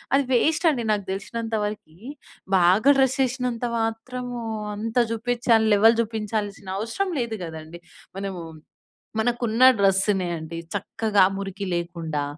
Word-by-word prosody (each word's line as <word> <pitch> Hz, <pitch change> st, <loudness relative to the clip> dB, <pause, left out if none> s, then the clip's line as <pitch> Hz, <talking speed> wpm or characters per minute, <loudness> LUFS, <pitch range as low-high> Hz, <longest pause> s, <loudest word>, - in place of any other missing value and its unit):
అది 275 Hz, 0 st, +2 dB
వేస్ట్ 320 Hz, +7 st, +2 dB
అండి. 240 Hz, -5 st, -3 dB
నాకు 205 Hz, -2 st, -3 dB
తెలిసినంత 225 Hz, +3 st, -4 dB
వరకి 205 Hz, -6 st, -8 dB, 0.6 s
బాగా 185 Hz, +9 st, +4 dB
డ్రెస్ 265 Hz, 0 st, +2 dB
ఏసినంత 250 Hz, -1 st, -3 dB
మాత్రం 225 Hz, +3 st, -3 dB, 0.5 s
అంత 225 Hz, +3 st, -4 dB, 0.2 s
చూపించాలి 230 Hz, -1 st, +2 dB
లెవెల్ 225 Hz, +3 st, +6 dB, 0.2 s
చూపించాల్సిన 205 Hz, -2 st, -3 dB
అవసరం 230 Hz, -, -2 dB
లేదు 235 Hz, -2 st, -2 dB
కదండీ. 160 Hz, 0 st, -8 dB, 0.4 s
మనము 195 Hz, -2 st, -5 dB, 0.8 s
మనకున్న 240 Hz, +1 st, +3 dB
డ్రెస్సునే 195 Hz, -1 st, +2 dB
అండి. 160 Hz, +1 st, -7 dB, 0.2 s
చక్కగా 205 Hz, 0 st, 0 dB
మురికి 195 Hz, 0 st, -5 dB
లేకుండా, 170 Hz, -3 st, -3 dB
220 Hz, 115 wpm, -24 LUFS, 195-235 Hz, 0.8 s, లెవెల్